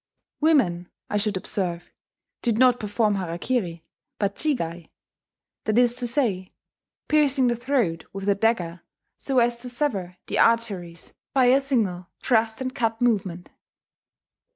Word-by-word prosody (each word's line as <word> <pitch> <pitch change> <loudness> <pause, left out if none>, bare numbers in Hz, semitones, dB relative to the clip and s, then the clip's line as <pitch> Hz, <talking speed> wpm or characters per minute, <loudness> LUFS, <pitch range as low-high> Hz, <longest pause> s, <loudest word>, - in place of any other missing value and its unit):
Women, 200 - +2 0.2
I 210 - +1
should 205 -1 0
observe, 180 -3 -3 0.5
did 230 -3 0
not 250 0 +5
perform 210 0 0
harakiri, 175 0 -2 0.3
but 200 -1 -1
jigai, 170 - -2 0.8
that 215 +1 +1
is 245 -1 +5
to 245 0 -2
say, 220 -8 -1 0.5
piercing 285 -3 +3
the 240 - +1
throat 235 -10 -1
with 195 0 -6
a 200 - +5
dagger 190 -5 0 0.4
so 270 -2 -2
as 240 0 +3
to 250 +1 -6
sever 205 -9 -2
the - - -2
arteries 195 -8 0 0.2
by 260 -2 +5
a 275 - +4
single 210 -10 -1
thrust 225 -1 +1
and 255 0 -3
cut 225 -2 -1
movement.... 195 -7 0
220 Hz, 135 wpm, -24 LUFS, 180-250 Hz, 0.8 s, not